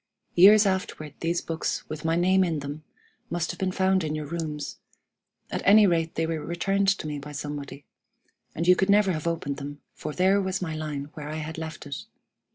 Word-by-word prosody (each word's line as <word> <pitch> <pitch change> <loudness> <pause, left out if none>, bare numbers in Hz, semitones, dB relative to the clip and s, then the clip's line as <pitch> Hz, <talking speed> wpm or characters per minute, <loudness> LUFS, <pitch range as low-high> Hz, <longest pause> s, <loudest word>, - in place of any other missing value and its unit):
Years 205 +4 +8
afterward 185 -6 -2
these 170 +1 0
books, 165 0 -3
with 155 -1 -6
my 165 0 +1
name 185 +2 +4
in 165 -3 0
them, 145 +2 -6 0.5
must 170 0 -1
have 175 - -11
been 190 -1 0
found 190 0 +2
in 155 -1 -2
your 155 -1 -4
rooms; 155 -1 -4 0.7
at - - -2
any 210 +1 +7
rate 165 -3 +1
they 165 - +1
were 160 -2 -3
returned 195 +4 0
to 195 -4 +2
me 150 -1 -3
by 150 +1 -9
somebody; 145 -1 -6 0.7
and 165 +2 -2
you 180 - +8
could 190 +2 +1
never 200 -1 +5
have 155 -1 -3
opened 150 -4 -2
them, 145 0 -7
for - - -5
there 190 +5 +3
was 190 -1 -1
my 160 -4 -3
line 150 -2 -4
where 150 -1 -7
I 155 - -4
had 160 +1 -5
left 160 -1 -6
it. 140 -2 -6
165 Hz, 205 wpm, -26 LUFS, 150-185 Hz, 0.7 s, Years